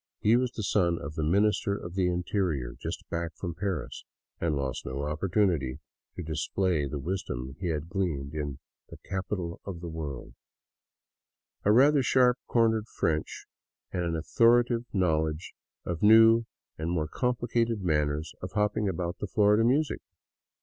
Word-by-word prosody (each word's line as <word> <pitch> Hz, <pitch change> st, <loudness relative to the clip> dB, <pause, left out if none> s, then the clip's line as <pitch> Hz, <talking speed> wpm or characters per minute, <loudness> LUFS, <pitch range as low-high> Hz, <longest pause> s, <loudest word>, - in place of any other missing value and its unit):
He 110 Hz, +3 st, +4 dB
was 125 Hz, 0 st, +1 dB, 0.2 s
son 85 Hz, -3 st, +2 dB
of 70 Hz, +2 st, -6 dB
the 80 Hz, -, -3 dB
Minister 100 Hz, +4 st, +2 dB
of 85 Hz, -3 st, -8 dB
the 95 Hz, -1 st, +1 dB
Interior, 90 Hz, -, -1 dB
just -, -, -5 dB
back 85 Hz, -1 st, -3 dB
from 85 Hz, -3 st, -5 dB
Paris, 95 Hz, -1 st, -4 dB, 0.4 s
and 80 Hz, -3 st, 0 dB
lost 65 Hz, -2 st, -3 dB
no 65 Hz, +2 st, -4 dB
opportunity 75 Hz, -3 st, 0 dB, 0.4 s
to 90 Hz, -, -5 dB
display 80 Hz, 0 st, 0 dB
the 75 Hz, -, -4 dB
wisdom 70 Hz, -5 st, -4 dB
he 95 Hz, -, -3 dB
had 80 Hz, -1 st, -2 dB
gleaned 85 Hz, -7 st, -2 dB
in 75 Hz, -3 st, -3 dB, 0.3 s
the -, -, -10 dB
" -, -, -26 dB
Capital 95 Hz, -3 st, -3 dB
of 95 Hz, -4 st, -6 dB
the 85 Hz, 0 st, -6 dB
World," 75 Hz, -5 st, -6 dB, 0.7 s
— -, -, -54 dB
a 105 Hz, -, +5 dB
rather 140 Hz, +5 st, +6 dB
sharp 125 Hz, 0 st, +3 dB
cornered 110 Hz, -2 st, +2 dB
French 80 Hz, -7 st, -2 dB, 0.5 s
and 90 Hz, -, -1 dB
an 85 Hz, -1 st, -1 dB
authoritative 120 Hz, +7 st, +3 dB
knowledge 80 Hz, -4 st, 0 dB, 0.3 s
of 85 Hz, -2 st, -3 dB
new 115 Hz, +2 st, +7 dB, 0.3 s
and 80 Hz, +1 st, -2 dB
more 80 Hz, -3 st, 0 dB
com 125 Hz, +9 st, 0 dB
plicated 115 Hz, -2 st, 0 dB
manners 75 Hz, -2 st, 0 dB
of 90 Hz, +1 st, -6 dB
hopping 105 Hz, -1 st, +1 dB
about 85 Hz, 0 st, -3 dB
the 105 Hz, -, -3 dB
floor 105 Hz, +1 st, +4 dB
to 110 Hz, -, +3 dB
music. 140 Hz, +6 st, +2 dB
90 Hz, 160 wpm, -28 LUFS, 80-105 Hz, 0.7 s, new